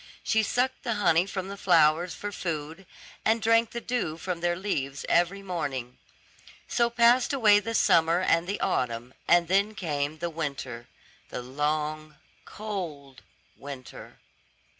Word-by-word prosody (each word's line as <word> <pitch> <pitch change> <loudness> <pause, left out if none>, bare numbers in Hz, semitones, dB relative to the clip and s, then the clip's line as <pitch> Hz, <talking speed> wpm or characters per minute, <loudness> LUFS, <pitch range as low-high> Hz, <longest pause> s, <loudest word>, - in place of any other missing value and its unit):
She 220 - +2
sucked 250 +4 0
the 235 -3 -2
honey 185 -3 +3
from 190 -1 -4
the 200 - -6
flowers 165 -2 +3
for 205 +3 -5
food, 165 0 -5 0.4
and 225 +1 +3
drank 230 +1 +3
the 235 - -5
dew 235 -10 -2
from 175 0 -4
their 175 0 +1
leaves 140 -8 -3
every 175 +4 +2
morning. 135 -9 -4 0.7
So 235 -1 +2
passed 240 +2 +4
away 215 -6 +5
the 225 +2 -4
summer 165 -2 +4
and 170 -2 +2
the 200 - -2
autumn, 125 -8 -1
and 175 0 +4
then 200 +4 +2
came 150 -4 -2
the 170 +2 -3
winter, 140 -7 -5 0.4
the 125 - -5
long, 150 +3 -2 0.3
cold 165 -11 -6 0.3
winter. 135 -3 -10
175 Hz, 140 wpm, -27 LUFS, 150-205 Hz, 0.7 s, away